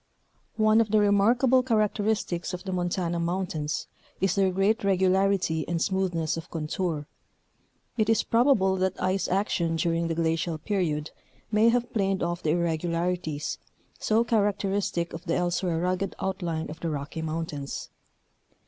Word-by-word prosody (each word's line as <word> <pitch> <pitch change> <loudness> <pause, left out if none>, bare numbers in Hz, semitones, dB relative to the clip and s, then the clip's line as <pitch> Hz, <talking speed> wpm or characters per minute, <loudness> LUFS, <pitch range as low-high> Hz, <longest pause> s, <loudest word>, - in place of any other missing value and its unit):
One 215 0 +5
of 220 - 0
the 215 - +3
remarkable 235 +6 +4
characteristics 210 -6 0
of 180 - -9
the 190 - -4
Montana 175 -1 -1
moun 175 +3 0
tains 150 -3 -3 0.3
is 190 -1 +2
their 195 -1 +3
great 195 +5 +1
regularity 190 -3 +2
and 170 -1 -1
smoothness 175 -4 0
of 165 +1 -7
contour. 160 -1 -2 0.9
It 215 -1 +2
is 225 - +3
probable 230 -6 +3
that 185 0 -1
ice 185 0 0
action 175 -3 0
during 165 0 0
the 165 - -1
glacial 165 0 0
period 155 -4 -1 0.4
may 215 +2 +5
have 240 +1 0
planed 195 -4 0
off 170 0 -2
the 155 - -1
irregularities, 170 -1 -1 0.4
so 220 +2 +2
characteristic 200 -5 0
of 165 +3 -8
the 165 - 0
elsewhere 175 -1 0
rugged 185 +2 -1
outline 170 -5 -3
of 160 - -9
the 165 - -2
Rocky 150 +1 -4
Mountains. 155 -3 -4
180 Hz, 145 wpm, -27 LUFS, 165-200 Hz, 0.9 s, One